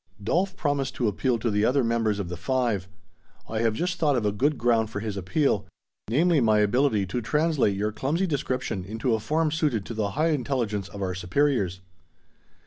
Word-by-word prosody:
Dolf 185 - 0
promised 145 -3 -1
to 120 - 0
appeal 120 +4 0
to 115 0 -1
the 105 0 +1
other 130 +4 +3
members 115 -3 +1
of 100 -3 -3
the 90 - -5
Five. 115 -1 -1 0.6
I 110 - -3
have 115 -1 +1
just 180 +6 -2
thought 150 -4 +3
of 120 -4 0
a 105 - +2
good 140 +8 +1
ground 115 -2 +2
for 105 - -4
his 105 -1 -4
appeal; 100 - 0 0.4
namely, 155 +5 +3
my 110 -2 +4
ability 105 0 +2
to 110 +7 -3
translate 150 -5 +1
your 105 +2 0
clumsy 150 - -1
description 130 - -2
into 110 +5 -1
a 110 - +1
form 155 +7 0
suited 150 -10 0
to - - -6
the 105 -2 -1
high 160 +2 +3
intelligence 120 -9 -1
of 100 -1 -6
our 90 -1 -1
superiors." 95 0 0
115 Hz, 195 wpm, -26 LUFS, 105-145 Hz, 0.6 s, my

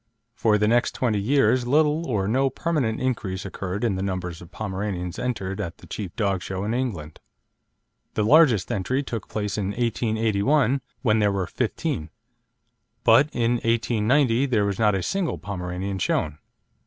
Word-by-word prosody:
For 110 -2 +2
the 105 0 +2
next 120 +2 +2
twenty 110 -5 +1
years 130 +2 +2
little 155 +4 +2
or 105 -6 0
no 135 +5 +2
permanent 135 -5 -1
increase 105 -7 -2
occurred 100 +1 -4
in 105 -5 +1
the - - -3
numbers 90 -3 -3
of 85 - -12
Pomeranians 95 -2 -4
entered 105 -5 -3
at 85 -4 -5
the - - -15
chief 95 -5 -6
dog 100 -5 0
show 95 +2 -4
in 105 +2 -1
England. 95 -12 -3 1.0
The 105 - +1
largest 135 - +5
entry 125 +9 -1
took 115 -6 -5
place 105 -1 -2
in 100 - -1
1881, 115 +4 +1 0.2
when 110 -3 +3
there 105 -1 +3
were 100 -2 -1
fifteen; 80 -1 -2 0.9
but 145 +3 +6
in 115 -1 +1
1890 115 +3 +2
there 110 -6 +2
was 100 -2 -2
not 105 -2 +3
a 95 - -1
single 195 -4 -1
Pomeranian 95 0 -4
shown. 75 -4 -1
105 Hz, 160 wpm, -24 LUFS, 95-125 Hz, 1.0 s, but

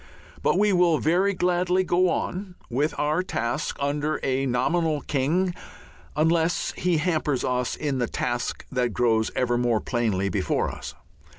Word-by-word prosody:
But - - +2
we 205 0 +3
will 175 -3 +4
very 185 +6 +2
gladly 180 +1 +2
go 180 0 +2
on 185 +1 -3 0.2
with 145 +6 0
our 150 +4 +1
task 120 -6 -2
under 145 +2 -1
a 135 +1 0
nominal 155 +5 +1
king 160 +8 0 0.6
unless 165 +2 +2
he 180 -2 +1
hampers 155 -4 0
us 125 -1 -1
in 140 -4 -2
the 120 - 0
task 120 +1 -3
that 125 -3 0
grows 110 -2 +2
ever 120 -1 +1
more 120 -3 +2
plainly 110 -7 0
before 95 - 0
us. - - -8
150 Hz, 150 wpm, -25 LUFS, 125-175 Hz, 0.6 s, will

